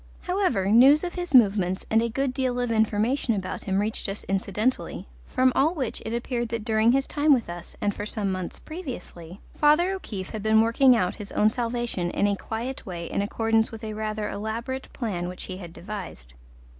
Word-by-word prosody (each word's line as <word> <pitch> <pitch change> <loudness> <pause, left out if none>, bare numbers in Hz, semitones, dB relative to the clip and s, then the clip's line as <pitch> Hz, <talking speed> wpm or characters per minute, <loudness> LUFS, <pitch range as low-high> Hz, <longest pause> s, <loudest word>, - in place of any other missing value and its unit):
However, 360 - 0
news 260 - +6
of 350 - -3
his 355 -5 -2
movements 195 -5 +4
and 225 +1 +5
a 235 - 0
good 270 +3 -1
deal 255 -2 -1
of 245 -1 -1
information 220 +3 +1
about 185 -2 -4
him 190 -1 0
reached 210 0 -1
us 195 - -5
incidentally, 200 +5 -1 0.2
from 255 0 +3
all 310 +6 +2
which 260 -7 -3
it 220 - -4
appeared 240 0 -2
that 225 -2 -4
during 220 0 +3
his 270 +1 +2
time 295 -1 +3
with 240 - -3
us, 175 0 -8
and 205 - +1
for 205 - -5
some 205 -3 -2
months 185 -2 -4
previously, 205 - -8
Father 310 +5 +4
O'Keefe 210 - -5
had 215 - -5
been 220 +1 +4
working 245 +3 +5
out 180 -6 0
his 205 -1 -8
own 215 +1 +4
salvation 235 -6 -2
in 200 - 0
a 205 0 +2
quiet 230 +6 -5
way 175 -3 -6
in - - 0
accordance 225 +2 +1
with 225 0 -9
a 215 -1 -4
rather 215 0 -3
elaborate 230 +6 -4
plan 190 -8 -3
which 180 - -8
he 185 - -6
had 175 -3 -9
devised. 175 - -8
220 Hz, 200 wpm, -26 LUFS, 200-255 Hz, 0.2 s, news